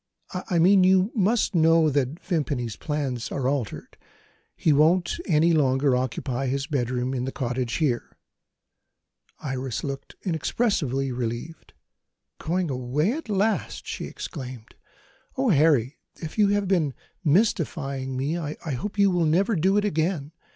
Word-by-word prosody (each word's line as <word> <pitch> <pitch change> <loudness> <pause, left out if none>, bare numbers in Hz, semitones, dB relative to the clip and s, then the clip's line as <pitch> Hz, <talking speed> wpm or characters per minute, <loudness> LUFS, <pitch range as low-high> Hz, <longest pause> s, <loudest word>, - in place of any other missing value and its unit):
"I 180 -1 -2
mean, 185 +3 +6
you 190 +3 +4
must 220 +1 +1
know 165 -2 +4
that 140 +3 -1
Vimpany's 145 - -2
plans 140 -6 -3
are 135 -2 -1
altered. 135 -6 -3 0.6
He 155 - +2
won't 170 - +3
any 165 -1 +4
longer 135 -3 +3
occupy 130 +1 -2
his 135 +1 -1
bedroom 130 -3 -1
in 125 -1 -2
the 135 - -3
cottage 125 -3 -2
here." 135 -7 -1 1.2
Iris 130 -3 -4
looked 140 -1 -6
inexpressibly 160 - 0
relieved. 120 - -5 0.7
"Going 175 -1 -1
away, 130 - 0
at 295 -3 -5
last!" 210 +2 0
she - - -5
exclaimed. 125 -5 -8 0.6
"Oh, 265 -1 +2
Harry, 145 - +3 0.2
if 160 - -7
you 210 -2 +4
have 205 -1 +1
been 165 -8 +1 0.3
mystifying 145 - 0
me, 145 +6 -1
I 150 -2 -4 0.2
hope 195 +12 -4
you 200 -1 +4
will 175 -2 +2
never 190 +8 +2
do 190 +4 +2
it 210 - +2
again. 160 -5 -1
150 Hz, 135 wpm, -25 LUFS, 130-180 Hz, 1.2 s, mean